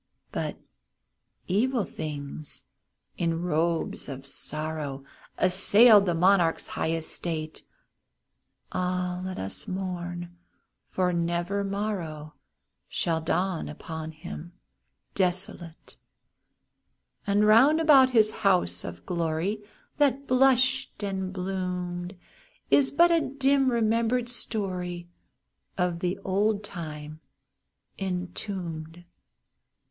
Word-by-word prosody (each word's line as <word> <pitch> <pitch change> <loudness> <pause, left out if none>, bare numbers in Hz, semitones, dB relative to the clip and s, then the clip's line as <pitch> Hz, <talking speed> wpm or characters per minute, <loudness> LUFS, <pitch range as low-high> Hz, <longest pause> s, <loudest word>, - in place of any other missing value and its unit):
But - - -3 0.9
evil 230 +5 +1
things, 150 -2 -6 0.6
in 165 0 0
robes 165 -1 0
of 135 0 -7
sorrow, 150 -1 -4 0.3
Assailed 200 +3 +6
the 175 - +1
monarch's 175 -1 +3
high 160 - -1
estate. 160 -1 -3 1.1
(Ah, 180 0 -1
let 185 0 -5
us 95 - -4
mourn! 175 -2 -4 0.5
for 180 -1 0
never 175 +4 -1
morrow 190 -7 -3 0.6
Shall 165 -2 0
dawn 175 +2 -1
upon 160 +1 -6
him 170 +1 -9 0.6
desolate 180 -3 -3 0.6
!) - - -39
And 205 +1 +3
round 255 +9 +6
about 280 -5 +7
his 220 -4 +5
home 195 -5 +3
the 90 0 -2
glory 170 +5 -1 0.4
That 280 -1 +2
blushed 265 -1 +3
and 190 -2 -2
bloomed, 180 -1 -4 0.5
Is 275 -2 +6
but 340 +4 +5
a 335 -1 +4
dim 270 -1 +2
remembered 235 +1 +1
story 180 -7 -3 0.7
Of 180 -2 0
the 180 +2 -1
old 205 +2 +1
time 155 -5 -7 0.8
entombed. 175 -3 -5
180 Hz, 95 wpm, -27 LUFS, 165-210 Hz, 1.1 s, about